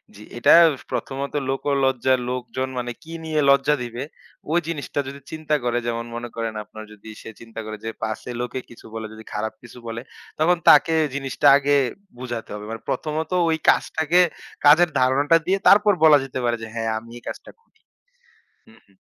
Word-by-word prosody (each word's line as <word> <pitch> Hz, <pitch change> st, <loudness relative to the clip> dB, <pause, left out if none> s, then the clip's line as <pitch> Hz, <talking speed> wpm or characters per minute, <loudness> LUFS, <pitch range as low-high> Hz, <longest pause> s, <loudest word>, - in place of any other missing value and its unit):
জি। 105 Hz, -, -12 dB
এটা 120 Hz, -, +5 dB, 0.4 s
প্রথমত 140 Hz, +1 st, -4 dB, 0.2 s
লোকোলজ্জা, 135 Hz, -2 st, +1 dB, 0.2 s
লোকজন 125 Hz, +1 st, -3 dB
মানে 120 Hz, 0 st, -4 dB
কি 165 Hz, -, -10 dB
নিয়ে 155 Hz, -1 st, -1 dB
লজ্জা 140 Hz, +2 st, +4 dB
দিবে, 120 Hz, +1 st, -5 dB, 0.5 s
ওই 170 Hz, -, +3 dB
জিনিসটা 150 Hz, -3 st, -4 dB
যদি 140 Hz, +1 st, -8 dB
চিন্তা 155 Hz, -1 st, -1 dB
করে, 120 Hz, 0 st, 0 dB
যেমন 115 Hz, 0 st, -2 dB
মনে 120 Hz, 0 st, -5 dB
করেন 115 Hz, -1 st, -3 dB
আপনার 110 Hz, +1 st, -11 dB
যদি 105 Hz, +1 st, -13 dB
সে -, -, -9 dB
চিন্তা 115 Hz, -1 st, -10 dB
করে 110 Hz, 0 st, -6 dB
যে, -, -, -2 dB
পাছে 110 Hz, +3 st, -4 dB
লোকে 125 Hz, +1 st, -4 dB
কিছু 120 Hz, -, -15 dB
বলে 110 Hz, -1 st, -5 dB
যদি 110 Hz, 0 st, -11 dB
খারাপ 110 Hz, +1 st, -3 dB
কিছু 120 Hz, 0 st, -14 dB
বলে, 115 Hz, 0 st, -5 dB, 0.4 s
তখন 175 Hz, +3 st, +3 dB
তাকে 155 Hz, +2 st, +6 dB, 0.2 s
জিনিসটা 135 Hz, 0 st, 0 dB
আগে 145 Hz, 0 st, +1 dB, 0.4 s
বুঝাতে 120 Hz, -2 st, -6 dB
হবে। 105 Hz, 0 st, -7 dB
মানে 115 Hz, -, -6 dB
প্রথমত 155 Hz, +2 st, -3 dB, 0.2 s
ওই 160 Hz, -, +1 dB
কাজটাকে 160 Hz, +2 st, +2 dB, 0.5 s
কাজের 160 Hz, +4 st, +7 dB
ধারণাটা 140 Hz, +5 st, +3 dB
দিয়ে 190 Hz, +2 st, +2 dB
তারপর 205 Hz, +1 st, +6 dB
বলা 155 Hz, -2 st, +8 dB
যেতে 135 Hz, -1 st, -5 dB
পারে 120 Hz, 0 st, +1 dB
যে, -, -, -5 dB
হ্যাঁ, 115 Hz, -1 st, -2 dB
আমি 115 Hz, +1 st, -9 dB
এই 120 Hz, -, -14 dB
কাজটা -, -, -8 dB
করি। 460 Hz, -, -37 dB, 0.9 s
হু, -, -, -18 dB
হুম। -, -, -29 dB
130 Hz, 180 wpm, -22 LUFS, 115-150 Hz, 0.9 s, বলা